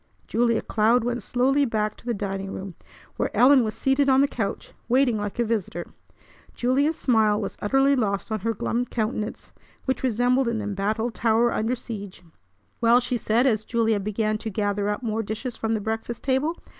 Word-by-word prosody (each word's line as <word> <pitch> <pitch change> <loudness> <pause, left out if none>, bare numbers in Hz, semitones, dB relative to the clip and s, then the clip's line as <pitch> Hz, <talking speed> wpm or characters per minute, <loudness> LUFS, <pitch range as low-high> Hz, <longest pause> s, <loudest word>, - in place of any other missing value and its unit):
Julia 235 0 +1
Cloud 225 +2 +2
went 240 0 -2
slowly 265 +6 +2
back 215 -4 -1
to - - -16
the 240 - +1
dining 195 -1 -4
room, 190 -1 -6 0.4
where - - 0
Ellen 260 0 +6
was 215 -1 -3
seated 275 +1 +2
on 265 0 +5
the 280 - +4
couch, 220 -7 -4 0.2
waiting 250 -1 +3
like 205 +1 -4
a 240 - +2
visitor. 210 -6 -3 0.6
Julia's 280 +6 +1
smile 220 -4 +3
was 200 - -4
utterly 270 +6 +3
lost 205 -3 -1
on 215 - -1
her 225 +3 -2
glum 235 +4 -1
countenance, 215 -2 -3 0.3
which 260 - -1
resembled 250 +1 +2
an 235 -1 -1
embattled 210 +3 -2
tower 230 +1 +2
under 225 +4 0
siege. 205 -6 -8 0.6
"Well!" 235 +1 +6
she 245 0 -2
said 230 +2 +1
as 220 -5 +2
Julia 225 -2 +1
began 215 +1 -1
to 225 - -4
gather 205 0 -1
up 210 +4 -3
more 225 -1 -1
dishes 225 +3 -5
from 225 0 -1
the - - -1
breakfast 225 +2 -4
table. 275 +5 0
225 Hz, 180 wpm, -24 LUFS, 210-250 Hz, 0.6 s, Ellen